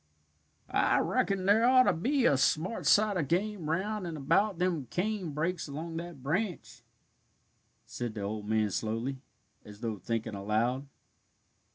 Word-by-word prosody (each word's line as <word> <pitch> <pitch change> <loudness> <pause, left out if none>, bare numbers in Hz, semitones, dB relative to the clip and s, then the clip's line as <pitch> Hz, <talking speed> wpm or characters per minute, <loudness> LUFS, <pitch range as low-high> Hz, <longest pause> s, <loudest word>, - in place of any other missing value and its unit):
"I - - +3
reckon 195 -2 0
there 205 +3 +5
ought 255 +1 +6
to - - +3
be 255 - +1
a 140 - +5
smart 160 - 0
sight 210 -2 +4
of 155 -5 -1
game 185 -1 -1
round 190 +3 -1
and 165 -2 -5
about 195 +8 +2
them 175 -7 -1
cane 195 - -2
brakes 160 +4 -2
along 160 +3 -5
that 165 -5 -7
branch," 180 +6 -2 1.0
said 120 -2 -5
the 105 - -4
old 105 +1 -4
man 110 -2 +2
slowly, 115 +6 -2 0.4
as 105 +1 -13
though 110 -4 -3
thinking 110 +3 -3
aloud. 110 +7 -1
160 Hz, 150 wpm, -30 LUFS, 115-195 Hz, 1.0 s, ought